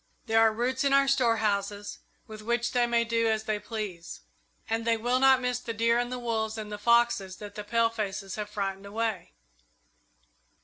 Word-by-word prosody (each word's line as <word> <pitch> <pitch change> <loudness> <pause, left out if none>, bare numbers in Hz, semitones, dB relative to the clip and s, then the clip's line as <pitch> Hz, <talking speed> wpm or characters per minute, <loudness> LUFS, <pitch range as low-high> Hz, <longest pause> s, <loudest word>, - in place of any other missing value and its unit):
There 225 0 +3
are 225 -1 +5
roots 250 +4 -1
in 280 -1 +2
our 275 0 +5
storehouses 210 -6 0 0.3
with 215 -1 -10
which 235 +2 -1
they 245 -1 +2
may 235 0 +2
do 230 0 +1
as 220 -1 0
they 215 -1 -2
please, 205 -5 -6 0.5
and 225 +1 -1
they 230 0 +2
will 245 +3 +1
not 265 -1 +6
miss 250 0 -1
the 230 -2 -6
deer 230 +2 +2
and 245 0 -2
the 250 - -3
wolves 225 -2 -2
and 215 -1 -6
the 210 - -5
foxes 235 -4 +2
that 205 -1 -9
the 210 - -6
palefaces 210 -3 -1
have 210 -1 -5
frightened 195 -1 -4
away. 220 -1 -3
225 Hz, 185 wpm, -28 LUFS, 210-235 Hz, 0.5 s, not